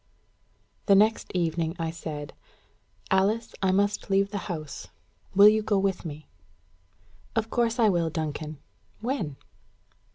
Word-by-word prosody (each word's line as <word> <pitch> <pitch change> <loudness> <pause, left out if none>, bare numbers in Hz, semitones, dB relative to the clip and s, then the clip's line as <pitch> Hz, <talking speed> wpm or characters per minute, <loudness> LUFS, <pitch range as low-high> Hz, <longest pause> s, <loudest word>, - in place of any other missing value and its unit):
The 200 - +7
next 215 +3 +3
evening 165 -1 0
I 165 -2 -2
said, 155 -3 -6 0.8
"Alice, 205 +4 +2
I 190 -1 +3
must 205 +2 +1
leave 195 0 +2
the 205 - -2
house: 155 -5 -6 0.5
will 200 +1 +9
you 215 +1 +5
go 210 -1 +1
with 190 -2 0
me?" 155 -1 -7 1.1
"Of 225 0 -1
course 235 0 +1
I 230 -3 +5
will, 170 -4 +2
Duncan. 155 -1 -4 0.4
When?" 220 - -2
190 Hz, 130 wpm, -27 LUFS, 160-210 Hz, 1.1 s, will